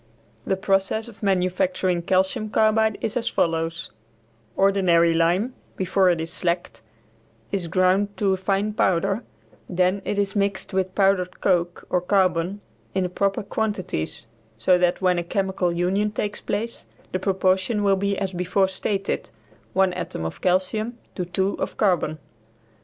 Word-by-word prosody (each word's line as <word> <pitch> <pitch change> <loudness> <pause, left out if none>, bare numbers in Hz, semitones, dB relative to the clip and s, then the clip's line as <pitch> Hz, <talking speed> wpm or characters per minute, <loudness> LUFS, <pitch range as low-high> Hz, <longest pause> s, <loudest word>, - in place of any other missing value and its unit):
The 190 - +1
process 195 +3 0
of 225 -2 -14
manufacturing 185 -2 +1
calcium 190 +5 +1
carbide 220 0 +3
is 220 - -2
as 245 - -1
follows: 165 0 -1 0.7
Ordinary 185 -4 +4
lime 175 +9 +2 0.2
before 190 0 +3
it 175 -2 +2
is 160 0 -4
slacked 175 -8 -2 0.7
is 190 -4 -1
ground 185 +4 +2
to 195 -2 +2
a - - 0
fine 195 +2 0
powder; 195 +2 +1 0.5
then 185 +2 +1
it 205 - -2
is 200 0 0
mixed 200 0 -1
with 185 -1 -1
powdered 195 -2 +2
coke 175 -2 0
or 180 - +2
carbon 185 0 +1 0.3
in 190 - +2
the 180 - -1
proper 195 +2 0
quantities, 200 - -3 0.3
so 180 +11 +4
that 180 +1 +1
when 180 -1 +3
a - - -2
chemical 190 0 0
union 185 +5 +1
takes 210 0 -3
place 225 +3 -4 0.2
the 185 - -1
proportion 190 +2 +1
will 200 -1 +4
be 200 +1 -1
as 195 -1 -2
before 185 +2 +1
stated, 195 +1 -2 0.4
one 190 -1 +3
atom 180 - -4
of 80 - -6
calcium 215 +6 0 0.2
to 180 - -3
two 190 +3 0
of - - -3
carbon. 180 -6 +1
190 Hz, 150 wpm, -24 LUFS, 180-200 Hz, 0.7 s, Ordinary